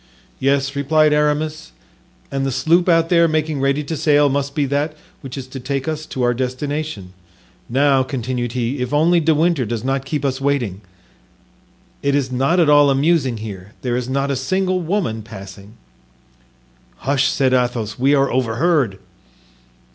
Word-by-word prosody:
"Yes," 135 Hz, +1 st, +1 dB
replied 150 Hz, +2 st, +3 dB
Aramis, 150 Hz, +1 st, -1 dB, 0.6 s
"and 135 Hz, -1 st, -1 dB
the 135 Hz, -, -1 dB
sloop 165 Hz, +8 st, +2 dB
out 165 Hz, -1 st, +3 dB
there 170 Hz, -1 st, +4 dB
making 155 Hz, -2 st, -1 dB
ready 140 Hz, +2 st, +1 dB
to 160 Hz, +3 st, -4 dB
sail 145 Hz, -1 st, +3 dB
must 140 Hz, 0 st, -2 dB
be 145 Hz, -, +1 dB
that 145 Hz, +3 st, -1 dB, 0.3 s
which 135 Hz, -1 st, -8 dB
is 135 Hz, -, -5 dB
to 135 Hz, -, -7 dB
take 135 Hz, +2 st, -3 dB
us 155 Hz, -1 st, -3 dB
to 130 Hz, -, -3 dB
our 120 Hz, 0 st, +3 dB
destination; 130 Hz, -4 st, -4 dB, 0.6 s
now," 135 Hz, +2 st, +3 dB
continued 125 Hz, -2 st, -3 dB
he, 125 Hz, +2 st, -2 dB
"if 125 Hz, +3 st, -2 dB
only 170 Hz, +3 st, +4 dB
De 160 Hz, -1 st, +2 dB
Winter 165 Hz, -2 st, +2 dB
does 115 Hz, 0 st, -4 dB
not 135 Hz, +1 st, -1 dB
keep 145 Hz, +1 st, -3 dB
us 135 Hz, 0 st, -1 dB
waiting. 125 Hz, -9 st, -1 dB, 1.2 s
It 140 Hz, -1 st, +1 dB
is 135 Hz, -3 st, 0 dB
not 135 Hz, +8 st, +1 dB
at 165 Hz, -, +4 dB
all 145 Hz, -1 st, +6 dB
amusing 135 Hz, -3 st, +2 dB
here; 100 Hz, 0 st, -9 dB
there 125 Hz, -2 st, -1 dB
is 125 Hz, 0 st, -3 dB
not 140 Hz, +1 st, 0 dB
a -, -, 0 dB
single 185 Hz, +8 st, 0 dB
woman 170 Hz, -, -2 dB
passing." 100 Hz, -1 st, -11 dB, 1.3 s
"Hush!" 140 Hz, 0 st, +2 dB
said 130 Hz, -2 st, +1 dB
Athos, 120 Hz, -4 st, -1 dB
"we 140 Hz, +3 st, +4 dB
are 135 Hz, -1 st, +2 dB
overheard." 125 Hz, -, +1 dB
140 Hz, 165 wpm, -19 LUFS, 125-150 Hz, 1.3 s, all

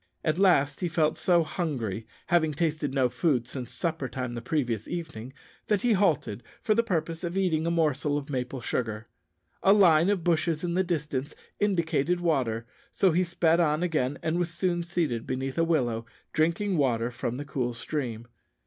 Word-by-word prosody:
At 155 Hz, +2 st, 0 dB
last 145 Hz, -8 st, +4 dB
he 180 Hz, -, 0 dB
felt 155 Hz, -2 st, +1 dB
so 175 Hz, -2 st, +4 dB
hungry, 120 Hz, -, -3 dB, 0.2 s
having 160 Hz, -4 st, +2 dB
tasted 155 Hz, -3 st, 0 dB
no 135 Hz, -2 st, +2 dB
food 125 Hz, -2 st, 0 dB
since 125 Hz, -3 st, -6 dB
supper 160 Hz, -6 st, -2 dB
time 125 Hz, -2 st, -4 dB
the 120 Hz, -, -5 dB
previous 120 Hz, -6 st, -1 dB
evening, 135 Hz, -9 st, -5 dB, 0.4 s
that 210 Hz, -3 st, +2 dB
he 240 Hz, -2 st, +3 dB
halted 165 Hz, -, +1 dB, 0.2 s
for 215 Hz, -, +2 dB
the 230 Hz, -, +4 dB
purpose 165 Hz, -6 st, -2 dB
of 175 Hz, +2 st, -3 dB
eating 165 Hz, -4 st, +1 dB
a -, -, +2 dB
morsel 150 Hz, -3 st, +1 dB
of 145 Hz, -1 st, -5 dB
maple 130 Hz, -2 st, -3 dB
sugar. 110 Hz, -2 st, -3 dB, 0.5 s
A 195 Hz, -, +6 dB
line 175 Hz, -4 st, +5 dB
of 200 Hz, -4 st, +1 dB
bushes 165 Hz, -1 st, +1 dB
in 170 Hz, -1 st, -1 dB
the 185 Hz, +2 st, +2 dB
distance 150 Hz, -5 st, -3 dB, 0.2 s
indicated 175 Hz, -4 st, +1 dB
water, 130 Hz, -10 st, 0 dB, 0.3 s
so 190 Hz, -, +3 dB
he 175 Hz, +3 st, +2 dB
sped 170 Hz, -1 st, +2 dB
on 155 Hz, 0 st, +2 dB
again, 145 Hz, -6 st, 0 dB
and 165 Hz, +2 st, 0 dB
was 175 Hz, -1 st, 0 dB
soon 175 Hz, 0 st, 0 dB
seated 170 Hz, -9 st, -2 dB
beneath 130 Hz, +3 st, -2 dB
a -, -, +4 dB
willow, 120 Hz, -9 st, 0 dB, 0.3 s
drinking 170 Hz, +4 st, +1 dB
water 120 Hz, -4 st, +1 dB
from 120 Hz, 0 st, -3 dB
the 145 Hz, -, -5 dB
cool 125 Hz, -4 st, -2 dB
stream. 120 Hz, -4 st, -4 dB
155 Hz, 180 wpm, -28 LUFS, 130-175 Hz, 0.5 s, A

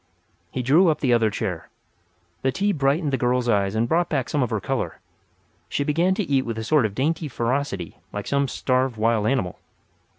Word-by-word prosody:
He 130 Hz, -, -3 dB
drew 155 Hz, +9 st, +5 dB
up 155 Hz, -, +2 dB
the 125 Hz, -4 st, +2 dB
other 115 Hz, -2 st, +3 dB
chair. -, -, -4 dB, 0.7 s
The 135 Hz, -, +1 dB
tea 200 Hz, +8 st, +1 dB
brightened 145 Hz, -1 st, +1 dB
the 135 Hz, -, +1 dB
girl's 125 Hz, 0 st, +1 dB
eyes 100 Hz, -3 st, +1 dB
and 115 Hz, +2 st, +1 dB
brought 170 Hz, +6 st, +1 dB
back 135 Hz, -5 st, -1 dB
some 150 Hz, -, 0 dB
of 125 Hz, -, +1 dB
her 110 Hz, -3 st, -1 dB
colour. -, -, -3 dB, 0.7 s
She 145 Hz, -, 0 dB
began 170 Hz, +6 st, +2 dB
to 210 Hz, -, 0 dB
eat 140 Hz, -6 st, +1 dB
with 115 Hz, -2 st, -4 dB
a 110 Hz, -, -3 dB
sort 140 Hz, -1 st, +3 dB
of 100 Hz, -, -12 dB
dainty 155 Hz, +4 st, 0 dB
ferocity 120 Hz, -, -2 dB
like 105 Hz, 0 st, -5 dB
some 140 Hz, 0 st, +1 dB
starved 130 Hz, -1 st, 0 dB
wild 110 Hz, -1 st, +2 dB
animal. 115 Hz, -10 st, -1 dB
130 Hz, 200 wpm, -23 LUFS, 115-150 Hz, 0.7 s, drew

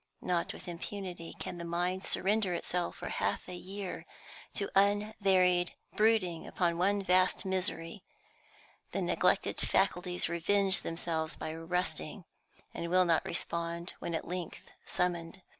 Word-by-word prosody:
Not 175 Hz, -2 st, 0 dB
with 180 Hz, -, -10 dB
impunity 175 Hz, 0 st, -6 dB
can -, -, -5 dB
the -, -, -4 dB
human 170 Hz, -, -5 dB
mind 185 Hz, +2 st, 0 dB
surrender 200 Hz, -2 st, +1 dB
itself 175 Hz, 0 st, -2 dB
for -, -, -6 dB
half -, -, -1 dB
a 180 Hz, -, -6 dB
year 190 Hz, +1 st, -6 dB, 0.5 s
to 200 Hz, -, 0 dB
unvaried 195 Hz, -3 st, +3 dB, 0.2 s
brooding 210 Hz, -6 st, +2 dB
upon 170 Hz, -2 st, 0 dB
one 200 Hz, +2 st, +3 dB
vast 185 Hz, +1 st, +3 dB
misery; 185 Hz, -1 st, -1 dB, 0.9 s
the -, -, 0 dB
neglected -, -, +2 dB
faculties 180 Hz, -2 st, +2 dB
revenge 190 Hz, +3 st, +3 dB
themselves 165 Hz, -1 st, -2 dB
by 155 Hz, -, -4 dB
rusting, 165 Hz, +1 st, -2 dB, 0.5 s
and 170 Hz, -, -4 dB
will 185 Hz, +1 st, +5 dB
not 165 Hz, -2 st, +3 dB
respond 170 Hz, +1 st, -2 dB
when 170 Hz, -, -3 dB
at -, -, -3 dB
length 180 Hz, -1 st, -5 dB, 0.2 s
summoned. 175 Hz, 0 st, -1 dB
180 Hz, 135 wpm, -32 LUFS, 170-195 Hz, 0.9 s, will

